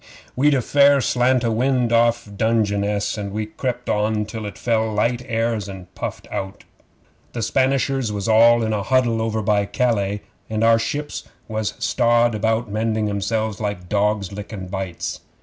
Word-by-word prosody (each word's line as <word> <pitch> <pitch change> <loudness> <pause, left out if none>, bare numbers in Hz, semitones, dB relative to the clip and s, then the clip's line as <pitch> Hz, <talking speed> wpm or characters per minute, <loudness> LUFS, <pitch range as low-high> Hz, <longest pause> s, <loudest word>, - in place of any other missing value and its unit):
'We'd 145 +3 +3
a 130 - 0
fair 140 +1 +5
slant 125 -1 +2
o' 115 - +1
wind 125 0 +1
off 120 0 +3
Dungeness, 105 -2 0
and 100 -1 -4
we 110 +1 -2
crept 125 +3 -4
on 105 0 0
till 110 0 -6
it 105 - -8
fell 110 -2 0
light 115 +4 0
airs 115 -3 -1
and 95 -1 -10
puffed - - -6
out. 95 +1 -5 0.7
The 115 - -3
Spanishers 135 0 +1
was 100 -1 -3
all 115 +1 +5
in 110 -1 0
a 105 - -1
huddle 120 0 +2
over 110 -1 -1
by 100 -1 +2
Calais, 105 -5 0 0.3
and 110 0 -1
our 115 0 +5
ships 145 +5 -4 0.2
was 110 -1 -3
strawed 120 -1 +2
about 110 +2 0
mending 110 0 -1
'emselves 110 +2 -2
like 100 -4 -4
dogs 105 -1 0
lickin' 100 -1 -7
bites. 95 -3 -4
110 Hz, 165 wpm, -21 LUFS, 105-120 Hz, 0.7 s, fair